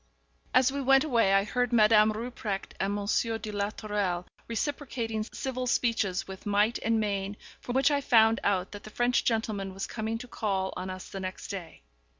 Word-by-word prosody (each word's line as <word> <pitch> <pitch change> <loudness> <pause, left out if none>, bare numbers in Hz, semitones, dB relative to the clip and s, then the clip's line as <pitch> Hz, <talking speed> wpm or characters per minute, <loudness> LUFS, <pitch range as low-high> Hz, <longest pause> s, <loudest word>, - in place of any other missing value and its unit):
As 255 +1 +4
we 280 +1 -2
went 270 +1 +5
away, 235 -9 +3
I 195 0 +4
heard 245 +3 -1
Madame 215 -1 +6
Rupprecht 215 -3 -4
and 200 +1 0
Monsieur 220 +2 0
de 215 -1 -6
la 205 0 -1
Tourelle 205 -5 -2 0.2
reciprocating 230 -3 -3
civil 255 -1 -3
speeches 220 -7 +1
with 190 +1 -9
might 205 +3 +2
and 225 0 +1
main, 200 -1 -2 0.2
from 245 - -5
which 270 +3 +4
I 285 -1 +2
found 225 -3 +5
out 190 -2 +1
that 205 - -8
the - - -9
French 240 +3 +1
gentleman 210 -4 -1
was 195 - -3
coming 220 0 -3
to 250 +2 -9
call 195 -5 -2
on 185 +1 -4
us 185 0 -7
the 195 - -7
next 185 -1 -6
day. 185 -5 -7
215 Hz, 185 wpm, -29 LUFS, 195-240 Hz, 0.2 s, Madame